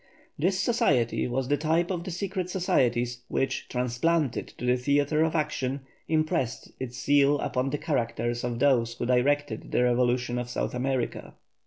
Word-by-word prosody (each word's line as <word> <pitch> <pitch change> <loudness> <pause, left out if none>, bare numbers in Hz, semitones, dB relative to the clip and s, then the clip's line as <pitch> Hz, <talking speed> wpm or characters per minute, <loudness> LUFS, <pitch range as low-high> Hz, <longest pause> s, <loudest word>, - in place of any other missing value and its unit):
This 185 +5 0
society 150 - +2
was 125 +1 -1
the 145 +1 +2
type 165 +4 +1
of 175 -2 -2
the 185 - -6
secret 185 0 -3
societies 125 -10 +1
which, 135 - -2
transplanted 125 +4 0
to 125 - -5
the 125 0 +4
theatre 145 +4 +1
of 160 0 0
action, 140 -3 -1 0.3
impressed 155 -6 0
its 125 -2 -5
seal 145 +2 +4
upon 130 -1 -1
the 145 - -1
characters 120 -1 -1
of 120 -1 -2
those 120 -3 +2
who 120 - -3
directed 130 0 +1
the 125 - +2
revolution 125 0 +1
of 120 0 -5
South - - -2
America. 130 0 -2
135 Hz, 160 wpm, -27 LUFS, 125-155 Hz, 0.3 s, the